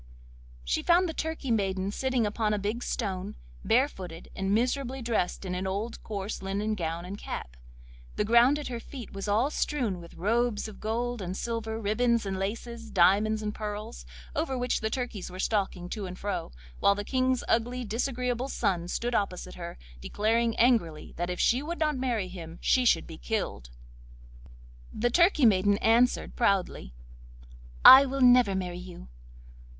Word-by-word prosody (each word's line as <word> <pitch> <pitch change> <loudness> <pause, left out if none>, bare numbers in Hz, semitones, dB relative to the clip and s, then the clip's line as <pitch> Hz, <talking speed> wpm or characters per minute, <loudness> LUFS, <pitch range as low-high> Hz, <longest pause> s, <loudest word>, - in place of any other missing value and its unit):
She - - 0
found 355 +2 +4
the 325 - -4
turkey 315 -5 -3
maiden 195 -3 0
sitting 255 0 0
upon 210 0 0
a - - -1
big 210 +4 -3
stone, 195 -7 -3 0.3
barefooted, 190 - -1
and 195 0 -2
miserably 255 +4 0
dressed 230 -6 -1
in 180 - -3
an 185 +1 -2
old, 205 +5 -4
coarse 205 -1 -5
linen 200 +3 -2
gown 170 -3 -3
and 200 +3 -7
cap; - - -6 0.6
the 210 - 0
ground 235 +6 +5
at 295 - -5
her 240 -2 -4
feet 245 -1 -10
was 195 +1 -5
all 225 +8 +2
strewn 240 -15 -1
with 170 - -13
robes 230 +2 0
of 215 - -11
gold 235 +1 -2
and 185 +1 -4
silver, 225 -1 -3
ribbons 230 +2 +1
and 190 -1 -3
laces, 230 +3 -5
diamonds 210 +4 +3
and 210 0 -2
pearls, 215 +2 -6 0.3
over 290 -5 -1
which 250 0 0
the 220 - -1
turkeys 240 -5 -4
were 185 - -9
stalking 190 -3 -1
to 205 -2 -4
and 180 0 -8
fro, 200 - -4 0.3
while 200 - +4
the 205 - -4
King's 255 0 +1
ugly, 245 +2 0
disagreeable 250 +3 -2
son 175 -8 -1
stood 240 +6 -2
opposite 200 -5 -2
her, 170 -1 -8 0.2
declaring 225 - 0
angrily 220 -11 +1
that 175 +1 -3
if 180 - -4
she 250 +3 +3
would 335 +4 -4
not 305 -2 +1
marry 245 -7 -1
him 170 -2 -9
she 255 -1 +2
should - - +3
be 160 - -10
killed. 200 - -3 1.2
The 240 +2 0
Turkey 340 -2 +4
maiden 200 -1 +4
answered 235 +4 +2
proudly: 190 - 0 0.9
'I 270 +1 +12
never 250 -3 +6
will - - -1
marry 180 -1 -4
you! 180 - -10
220 Hz, 165 wpm, -28 LUFS, 190-245 Hz, 1.2 s, I